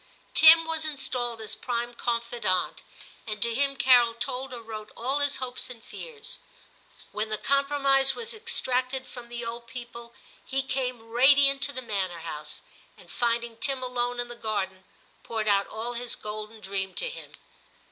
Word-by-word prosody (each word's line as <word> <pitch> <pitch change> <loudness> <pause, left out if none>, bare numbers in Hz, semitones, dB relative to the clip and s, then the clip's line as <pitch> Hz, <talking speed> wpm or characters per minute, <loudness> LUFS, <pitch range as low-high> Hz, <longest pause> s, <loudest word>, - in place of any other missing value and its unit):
Tim 325 +1 +9
was 320 -1 -2
installed 255 -6 -1
as 220 0 -2
prime 240 +2 -3
confidant, 235 -6 -1 0.5
and 215 -1 -4
to 235 - +1
him 275 +3 +1
Carol 245 -3 +6
told 255 +3 -3
or 240 -2 -7
wrote 215 -1 -8
all 265 +5 +1
his 285 0 +1
hopes 255 -1 -4
and 235 -3 -10
fears. 460 -3 -5 0.7
When 215 +1 -2
the 215 - -1
compromise 275 0 +3
was 465 +1 -4
extracted 260 - +1
from 245 -2 -11
the 240 0 -5
old 235 0 -6
people, 235 -1 -9 0.3
he 270 0 -1
came 250 -4 -2
radiant 275 +3 +6
to 285 - -2
the 255 -2 -6
manor 190 -6 -2
house, 150 -1 -6 0.3
and - - -16
finding 235 -1 0
Tim 265 +1 0
alone 245 -1 -1
in 245 - -2
the 240 - -8
garden, 195 -5 -3 0.4
poured 220 -2 -3
out 200 -1 +3
all 230 +2 -4
his 240 0 -1
golden 215 +1 -7
dream 190 -1 -2
to - - +1
him. - - -8
240 Hz, 165 wpm, -27 LUFS, 225-270 Hz, 0.7 s, Tim